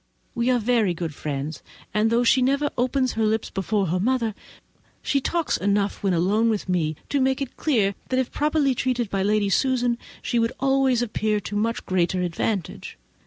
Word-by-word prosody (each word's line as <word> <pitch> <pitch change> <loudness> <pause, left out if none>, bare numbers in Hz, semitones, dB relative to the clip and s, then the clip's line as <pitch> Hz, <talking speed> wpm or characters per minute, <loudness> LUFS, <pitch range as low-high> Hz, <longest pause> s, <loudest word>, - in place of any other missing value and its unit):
We 235 +1 0
are 250 - +4
very 225 -5 +1
good 165 -2 -4
friends, 145 +1 -4 0.3
and 215 +1 +2
though 235 +2 +2
she 255 +2 +4
never 280 +3 +1
opens 255 +1 +1
her 225 - -1
lips 220 0 0
before 195 +1 0
her 180 +2 0
mother, 230 +1 0 0.7
she 275 - +1
talks 335 +4 0
enough 200 +1 0
when 195 - +1
alone 200 +7 +2
with 215 -3 -1
me 165 -4 0
to 280 - +1
make 265 0 +2
it 275 -3 -5
clear 215 -10 +1 0.2
that, 255 - 0
if 260 - -1
properly 295 -2 +1
treated 245 -3 -1
by 195 - 0
Lady 205 0 +2
Susan, 245 -1 +1 0.2
she 240 - 0
would 230 0 +1
always 270 -2 +2
appear 215 -2 0
to 205 - -6
much 225 +3 -1
greater 180 0 +1
advantage. 180 +2 -3
225 Hz, 185 wpm, -24 LUFS, 195-255 Hz, 0.7 s, are